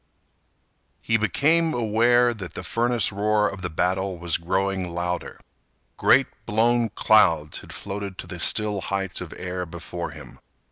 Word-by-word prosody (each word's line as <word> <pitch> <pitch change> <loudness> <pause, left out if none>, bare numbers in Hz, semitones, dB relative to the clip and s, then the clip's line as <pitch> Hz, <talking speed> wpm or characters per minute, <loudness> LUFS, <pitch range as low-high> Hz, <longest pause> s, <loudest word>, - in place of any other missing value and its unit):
He 115 - +1
became 155 - +2
aware 120 +2 +3
that 95 -5 -9
the - - -5
furnace 115 +7 +1
roar 105 +1 +1
of 95 - -6
the 90 - -3
battle 95 +3 -1
was 85 0 0
growing 95 +1 -1
louder. 90 +1 -4 0.6
Great - - +4 0.2
blown 115 +2 +2
clouds 85 -9 +3
had - - -12
floated 100 -1 -5
to - - -7
the 90 - -8
still 105 +3 +2
heights 95 -1 -3
of - - -7
air 90 0 -4
before 85 +1 -6
him. - - -12
100 Hz, 145 wpm, -24 LUFS, 90-110 Hz, 0.6 s, Great